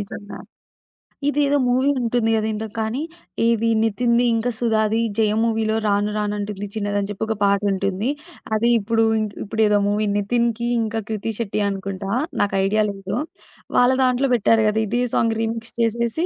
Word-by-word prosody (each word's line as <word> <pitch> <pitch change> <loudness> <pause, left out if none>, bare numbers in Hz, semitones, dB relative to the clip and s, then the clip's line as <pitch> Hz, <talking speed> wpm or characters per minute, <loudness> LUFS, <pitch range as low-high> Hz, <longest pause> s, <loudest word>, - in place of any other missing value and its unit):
నిజంగా. 205 +1 -8 0.9
ఇదేదో 290 0 +2
మూవీ 255 +3 +2
ఉంటుంది 235 -1 0
గదా! 220 0 0
ఏదో 215 +1 -4
కాన్ని 220 +5 -1 0.5
ఇది 230 0 +1
'నితిన్‌ది' 235 +2 +2
ఇంకా 230 +2 0
'సుధాది 220 -1 +1 0.2
జయం' 215 0 +2
మూవీ‌లో 220 -1 0
'రాను 205 0 +1
రాను 210 0 -1
అంటుంది 205 0 -4
చిన్నది' 205 -1 -2
అని 200 - -2
చెప్పి 205 +1 -4
ఒక 220 - -1
పాటుంటుంది. 200 +2 +1 0.4
అది 225 +2 +2
ఇప్పుడు, 225 +2 +1 0.4
ఇప్పుడు 220 +1 -2
ఏదో 210 0 +3
మూవీ 210 +1 +1
'నితిన్‌కి' 235 +3 0
ఇంకా 225 0 -2
'క్రితి 220 +1 -2
శెట్టి' 215 -2 -2
అనుకుంటా, 195 0 -5 0.3
నాకైడియా 200 +1 +2
లేదు. 195 0 -5 0.6
వాళ్ళ 245 +1 +5
దాంట్లో 255 +1 +2
బెట్టారు 225 0 +3
గదా! 215 +1 +1
ఇదే 240 +4 0
సాంగ్ 225 0 +2
రీమిక్స్ 225 0 -3
చేసేసి. 235 +7 0
220 Hz, 150 wpm, -21 LUFS, 205-230 Hz, 0.9 s, వాళ్ళ